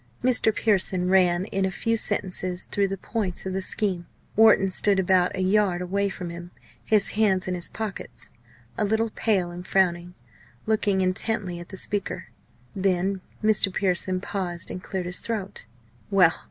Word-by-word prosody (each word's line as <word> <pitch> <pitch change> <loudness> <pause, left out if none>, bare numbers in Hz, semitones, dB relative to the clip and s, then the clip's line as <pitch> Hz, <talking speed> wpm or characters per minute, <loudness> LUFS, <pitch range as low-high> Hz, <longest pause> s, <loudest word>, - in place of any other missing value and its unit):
Mr. 245 -3 +4
Pearson 190 -4 +1
ran 180 -1 +3
in 195 - 0
a 190 - +2
few 230 +5 -1
sentences 185 -4 -2
through 200 -1 0
the 195 0 -4
points 195 -3 -3
of 190 - -3
the 190 - -1
scheme. 185 -3 -2 0.3
Wharton 215 -3 +5
stood 200 +1 +2
about 185 0 +2
a 185 - -1
yard 190 -2 +2
away 200 +3 -1
from 180 -3 -6
him, 175 +1 -8 0.3
his 210 -2 +3
hands 200 -4 +2
in 185 - -1
his 175 -1 -1
pockets, 215 -3 -6 0.5
a - - +2
little 220 +2 +1
pale 190 -7 0
and 175 +1 -8
frowning 175 -2 +1 0.5
looking 210 -3 +1
intently 185 -1 -1
at 175 - -10
the 190 - -9
speaker. 205 +1 0 0.5
Then 190 0 0 0.2
Mr. 215 -2 +4
Pearson 185 -1 0
paused 180 -4 -4
and 180 - -6
cleared 185 -1 -4
his 180 +1 -2
throat. 200 - -5 0.4
Well! 185 -5 +5
190 Hz, 165 wpm, -25 LUFS, 180-205 Hz, 0.5 s, Wharton